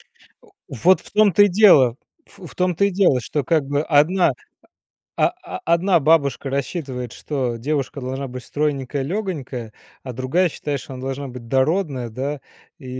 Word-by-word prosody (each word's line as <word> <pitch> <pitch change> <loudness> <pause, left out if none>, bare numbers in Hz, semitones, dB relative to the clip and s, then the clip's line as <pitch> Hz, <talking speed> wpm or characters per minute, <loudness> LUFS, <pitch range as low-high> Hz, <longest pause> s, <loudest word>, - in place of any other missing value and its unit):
Э, - - -29 0.5
вот 160 +7 +3
в - - -16
том-то 205 -1 +5
и 205 - +3
дело, 175 - +5 0.3
ф - - -21
в - - -15
том-то 180 +1 +1
и 200 - 0
дело, 180 -9 +3
что 145 +3 -3
как 155 0 +1
бы 145 +1 0
одна, 160 +2 +3 0.8
о - - +3
о 90 - -9
одна 170 +2 +3
бабушка 140 -3 +2
рассчитывает, 135 -3 -4
что 130 -5 -3
девушка 140 +1 -2
должна 130 +2 -4
быть 125 0 -8
стройненькая, 140 -2 -2
лёгонькая. 140 - -4 0.3
А 130 - -6
другая 130 +9 +1
считает, 145 -2 -4
что 135 - -10
она 130 - -8
должна 135 +1 -4
быть 125 -2 -10
дородная, 135 -1 0
да, 135 +5 -4 0.4
и 135 - -13
140 Hz, 165 wpm, -21 LUFS, 130-170 Hz, 0.8 s, том-то